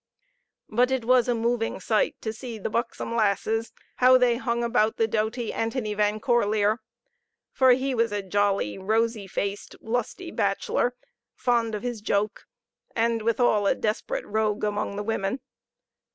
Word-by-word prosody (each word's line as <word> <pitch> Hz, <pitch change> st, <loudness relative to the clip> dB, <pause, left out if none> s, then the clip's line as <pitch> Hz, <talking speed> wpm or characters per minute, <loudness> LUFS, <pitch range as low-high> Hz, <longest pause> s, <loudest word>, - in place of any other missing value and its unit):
But 245 Hz, +4 st, +2 dB
it 260 Hz, -3 st, -1 dB
was 250 Hz, 0 st, +4 dB
a 245 Hz, -, +2 dB
moving 230 Hz, -1 st, -1 dB
sight 215 Hz, +3 st, +1 dB
to 220 Hz, -, -3 dB
see 235 Hz, 0 st, -7 dB
the 210 Hz, -, -4 dB
buxom 230 Hz, 0 st, -2 dB
lasses 220 Hz, +1 st, +1 dB, 0.3 s
how 255 Hz, 0 st, +7 dB
they 245 Hz, -2 st, +3 dB
hung 235 Hz, -1 st, -1 dB
about 230 Hz, -2 st, +2 dB
the 225 Hz, -, +2 dB
doughty 220 Hz, +2 st, -1 dB
Antony 225 Hz, -1 st, -2 dB
Van 210 Hz, +1 st, +1 dB
Corlear; 215 Hz, -2 st, +2 dB, 0.7 s
for 260 Hz, -1 st, +5 dB
he 260 Hz, +2 st, 0 dB
was 230 Hz, -2 st, +1 dB
a 205 Hz, -1 st, -2 dB
jolly, 195 Hz, -, 0 dB
rosy 220 Hz, +1 st, 0 dB
faced, 200 Hz, +1 st, -4 dB
lusty 245 Hz, +10 st, -3 dB
bachelor, 205 Hz, +4 st, 0 dB, 0.4 s
fond 230 Hz, -3 st, +1 dB
of 210 Hz, -, -5 dB
his 240 Hz, -3 st, -3 dB
joke, 205 Hz, 0 st, -1 dB, 0.5 s
and 230 Hz, 0 st, +1 dB
withall 220 Hz, -2 st, +2 dB
a -, -, +3 dB
desperate 215 Hz, 0 st, -2 dB
rogue 215 Hz, 0 st, -1 dB
among 205 Hz, -1 st, -1 dB
the 205 Hz, -, -3 dB
women. 205 Hz, +2 st, -1 dB
225 Hz, 150 wpm, -26 LUFS, 210-240 Hz, 0.7 s, how